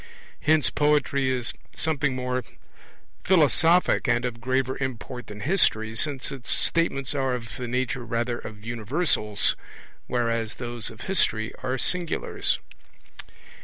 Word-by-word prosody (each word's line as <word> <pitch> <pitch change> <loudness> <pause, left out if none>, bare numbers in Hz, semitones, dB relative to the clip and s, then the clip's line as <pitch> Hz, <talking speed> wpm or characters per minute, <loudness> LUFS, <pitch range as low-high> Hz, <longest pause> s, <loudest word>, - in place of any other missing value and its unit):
Hence 155 -1 +3
poetry 145 -2 +2
is 125 -2 0 0.2
something 145 -4 0
more 125 0 -2 0.8
philosophic 170 0 +4
and 120 +1 +2
of 120 -1 -4
graver 130 +1 0
import 125 -2 -5
than 105 0 -8
history, 110 - +2
since 140 +3 +1
its 135 -3 -7
statements 140 -6 +1
are 135 -3 0
of 115 -2 -7
the 125 -1 -4
nature 125 +1 -1
rather 120 +1 -1
of 105 -1 -9
universals, 115 - +1 0.5
whereas 115 -2 -1
those 120 -2 -5
of 110 - -12
history 110 - +1
are 130 0 -1
singulars. 175 +5 0
125 Hz, 125 wpm, -26 LUFS, 115-145 Hz, 0.8 s, philosophic